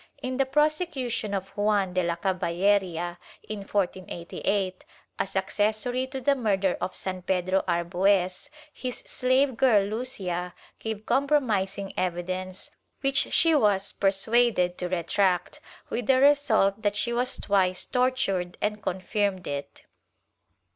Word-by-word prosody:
In 255 0 -3
the 270 -1 +2
prosecution 295 - 0
of 195 0 -4
Juan 205 -2 +1
de 185 - +2
la 170 -1 0
Caballeria, 175 -1 0 0.3
in 215 -1 -4
1488, 190 -1 -2 0.4
as 195 - -2
accessory 215 +6 0
to 265 0 -5
the 280 +2 +3
murder 200 -7 +1
of 185 - -3
San 185 -1 -4
Pedro 185 +1 +1
Arbues, 180 +5 +1 0.2
his 250 -1 -4
slave 260 +1 +2
girl 225 -5 +4
Lucia 195 -6 -3 0.2
gave 220 -1 -5
compromising 215 -9 +1
evidence 185 +1 -3 0.3
which 275 -1 +1
she 330 -1 +4
was 205 -8 +2
persuaded 195 -1 +2
to 180 - -2
retract, 180 +1 0 0.3
with 240 -2 -2
the 260 -1 +5
result 235 -8 +4
that 205 -2 0
she 235 +3 0
was 250 +1 -1
twice 185 -2 +1
tortured 225 -9 0
and 210 0 -1
confirmed 190 0 -1
it. 140 0 -6
200 Hz, 125 wpm, -27 LUFS, 185-245 Hz, 0.4 s, the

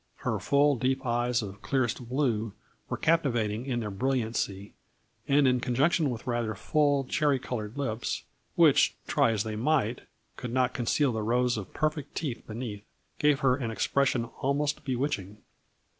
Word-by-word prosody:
Her - - 0
full 145 0 +3
deep 130 +2 0
eyes 120 0 +1
of 100 0 -8
clearest 120 -1 -1
blue 115 -6 0 0.4
were - - -2
captivating 120 -8 +1
in 120 -3 -1
their 105 -2 -4
brilliancy, 110 -4 -2 0.5
and, 140 0 +4
in 125 -1 +3
conjunction 140 +5 +2
with 120 -3 -5
rather 120 -3 -1
full, 145 +5 +2
cherry 145 +1 +1
colored 115 -2 -5
lips, 115 -5 -2 0.3
which, - - +5
try - - +3
as 105 -2 0
they 110 -1 -4
might, 125 -1 +1 0.4
could 125 - -5
not 125 0 +1
conceal 130 +3 +1
the 110 -1 -2
rows 120 +3 +1
of 100 -4 -6
perfect 155 -2 -2
teeth 140 -7 -3
be 110 - -7
neath, 110 -4 -5 0.4
gave 150 -1 +3
her 130 -3 +4
an 130 -4 -3
expression 130 +1 +1 0.2
almost 145 +2 0
bewitching. 125 -7 -2
125 Hz, 160 wpm, -28 LUFS, 110-140 Hz, 0.5 s, which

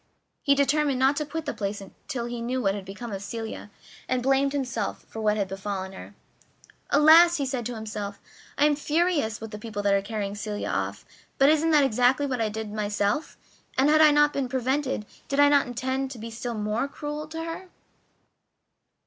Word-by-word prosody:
He 280 - +3
determined 280 0 +2
not 265 +2 +3
to 300 - -2
quit 320 +1 -4
the 290 - -2
place 200 -1 -3 0.3
till 240 -3 -3
he 240 0 -5
knew 250 +2 -1
what 195 -6 +1
had 200 -2 -6
become 210 +5 -7
of 195 - -4
Celia, 220 0 -6 0.4
and 255 -1 0
blamed 270 +1 +3
himself 250 -7 -3
for 225 - -7
what 210 0 +2
had 200 -2 0
befallen 195 0 -4
her. 190 - -11 0.7
"Alas!" 325 +4 +7
he 280 - -1
said 255 -3 -2
to 245 - -5
himself, 210 -2 -5 0.4
"I 290 - +4
am 300 -1 +4
furious 300 -6 0
with 225 -1 -8
the 210 - -7
people 210 -2 -5
who 205 - +2
are 200 0 +3
carrying 200 -1 -4
Celia 210 0 -4
off, - - -3 0.3
but 275 +1 +6
isn't 315 +1 +3
that 300 -3 +5
exactly 255 +2 +3
what 255 -4 -2
I 220 - +1
did 215 0 -5
myself, 205 +6 -1 0.4
and 270 +3 +4
if 310 0 +5
I - - +9
had 295 -1 +5
not 295 0 +4
been 270 -3 -2
prevented 260 -2 -1 0.2
did 275 - -1
I 285 0 +7
not 285 -2 +4
intend 260 +2 -2
to 260 - -8
be 230 +1 -7
still 235 +1 -4
more 215 +5 -1
cruel 295 +1 -6
to 325 +1 -5
her?" 330 +3 -6
250 Hz, 205 wpm, -26 LUFS, 215-290 Hz, 0.7 s, I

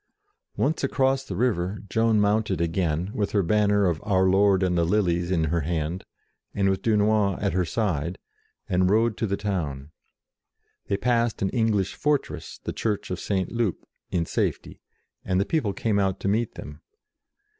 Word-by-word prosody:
Once 160 - 0
across 135 0 +1
the 100 - -6
river, 100 -3 -1
Joan 115 0 +2
mounted 105 -2 +1
again, 85 +1 -1
with 105 -2 -2
her 100 -2 +3
banner 105 +2 +3
of 85 -3 0
Our 95 -3 +2
Lord 95 0 +4
and 90 -1 +1
the 85 - +2
Lilies 85 -2 +1
in 85 -4 +1
her 80 +2 0
hand, 80 +3 -3 0.5
and 100 -1 +2
with 95 - -2
Dunois 105 -3 +2
at 100 -4 -1
her 90 0 +1
side, 85 -4 -1 0.5
and 90 0 +2
rode 110 +2 +3
to 115 - -1
the 100 0 -1
town. 80 -9 -3 1.0
They 100 - 0
passed 115 -1 +1
an 95 - +1
English 110 -5 +1
fortress, 150 -1 -2
the - - -4
Church 105 -4 -2
of 90 - -3
St. 95 -2 -1
Loup, 115 -6 -1 0.2
in 85 -2 0
safety, - - -2 0.4
and 95 -1 0
the 100 - +1
people 135 -10 0
came 105 0 0
out 95 -2 0
to - - -2
meet 110 +4 0
them. - - -9
100 Hz, 170 wpm, -25 LUFS, 90-110 Hz, 1.0 s, Lord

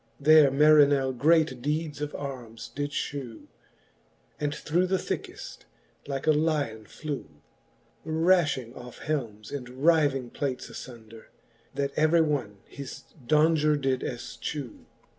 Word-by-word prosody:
There 150 0 +7
Marinell 140 -2 +5
great 150 -2 +3
deeds 150 +1 -2
of 150 0 -4
armes 125 -5 -7
did 145 +1 -2
ftiew, 135 -5 -5 0.9
And 150 -1 -1
through 175 +4 0
the 190 +1 +1
thickeft - - -6 0.4
like 135 -1 -3
a 155 - +5
lyon 150 -8 0
flew; 145 - -6 0.7
Raftiing 160 -6 +2
oft^ 125 -1 -11
helmes^ 115 -9 -4
and 125 -3 -6
ryving 135 -1 +2
plates 135 -3 -3
aibnder, 115 -3 -11 0.5
That 140 0 -1
every 155 +2 +4
one 140 -10 -1
his 140 -2 -9 0.2
daunger 155 0 +3
did 135 -2 0
elchew. 125 +1 -6
145 Hz, 120 wpm, -27 LUFS, 125-155 Hz, 0.9 s, There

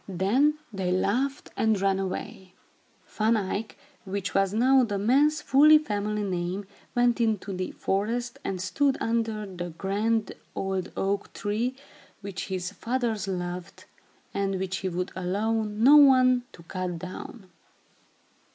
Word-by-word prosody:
Then 235 - +2 0.2
they 190 -2 -1
laughed 250 +9 0
and 220 -2 +2
ran 195 0 +1
away. 190 0 -5 0.5
Van 220 +1 +1
Eyck, 205 +2 -3 0.3
which 200 -1 -4
was 195 -1 +2
now 255 +5 +4
the 205 -4 -1
man's 285 +9 +3
full 300 +3 +7
family 210 -6 -2
name, 185 +1 -2 0.3
went 245 0 +3
into 215 -3 0
the 185 0 -3
forest 235 +5 -2
and 190 -2 -3
stood 270 +10 +1
under 225 -2 -1
the 175 -3 -6
grand 210 +3 0 0.2
old 190 -1 -2
oak 200 +1 -1
tree, 225 +5 -2 0.5
which 195 -2 -5
his 185 -1 -3
fathers 230 -2 -2
loved, 180 0 -5 0.5
and 195 -1 -1
which 190 0 -2
he 190 - -2
would 180 +2 -3
allow 195 +5 -1
none 255 +3 +5
to 170 - -14
cut 180 0 -4
down. 185 +3 -9
205 Hz, 135 wpm, -27 LUFS, 190-235 Hz, 0.5 s, full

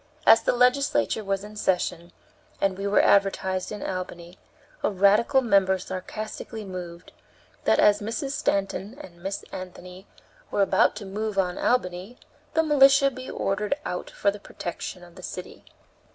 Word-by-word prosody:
As - - +7
the - - +1
legislature 250 - +2
was 195 0 -2
in 210 +1 -10
session, 180 -3 -1 0.5
and 195 -1 +1
we 195 +1 -3
were 200 - +4
advertised 190 -2 +2
in 210 -1 -5
Albany, 180 -1 -6 0.4
a - - +2
radical 210 +7 +4
member 195 -4 +3
sarcastically 215 +4 -6
moved 180 -2 -8 0.5
"That - - +4
as 205 0 +4
Mrs. 235 +7 -3
Stanton 200 -2 -1
and 170 -11 -12
Miss 195 +2 -4
Anthony 185 +1 -9 0.4
were 200 - +2
about 190 0 +3
to 205 -1 -7
move 210 +1 -4
on 180 -2 0
Albany, 195 -1 -1 0.4
the 320 - +4
militia 275 -2 +5
be 255 0 -8
ordered 210 +6 -1
out 180 - -4
for 200 - +1
the 205 - -9
protection 180 -1 -7
of 175 -1 -15
the 185 - -12
city." 180 0 -8
195 Hz, 150 wpm, -25 LUFS, 185-220 Hz, 0.5 s, As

